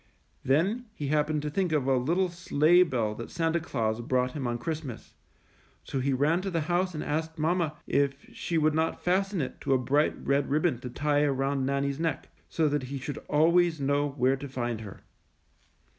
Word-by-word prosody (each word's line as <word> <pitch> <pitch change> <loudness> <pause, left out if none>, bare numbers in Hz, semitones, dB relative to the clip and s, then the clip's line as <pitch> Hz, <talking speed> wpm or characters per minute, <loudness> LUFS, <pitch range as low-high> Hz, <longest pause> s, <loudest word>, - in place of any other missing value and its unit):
Then 190 - +1
he 145 -2 -4
happened 150 0 +1
to 150 - -3
think 185 +1 0
of 150 -4 +1
a 135 0 +3
little 170 +9 +1
sleigh 175 0 +3
bell 120 -11 +1
that 115 +2 -7
Santa 165 0 0
Claus 115 -7 -2
brought 125 +1 0
him 135 -3 -3
on 120 0 -1
Christ 160 +4 -3
mas, 125 -6 -9 0.7
so 135 - -3
he 135 +2 0
ran 145 +7 +2
to 195 - -3
the 165 -3 -1
house 175 +3 0
and 155 - -3
asked 160 +2 -2
mamma 160 -1 0
if 140 -1 +1 0.2
she 170 - -2
would 155 -1 +3
not 160 +1 -1
fasten 190 0 +1
it 130 - -5
to - - +1
a - - +5
bright 140 +4 +1
red 140 0 +1
rib 150 +3 +1
bon 150 -9 +1
to 125 - -6
tie 145 +3 +1
around 135 -1 0
Nannie^s 140 +1 -1
neck, 165 -3 -2 0.2
so 160 -2 +1
that 145 -2 -1
he 140 - -4
should 135 +2 -5
always 165 +2 +3
know 140 +1 +1
where 135 -1 +1
to 140 +1 -7
find 120 -3 -3
her. 100 -3 -10
150 Hz, 205 wpm, -28 LUFS, 135-165 Hz, 0.7 s, a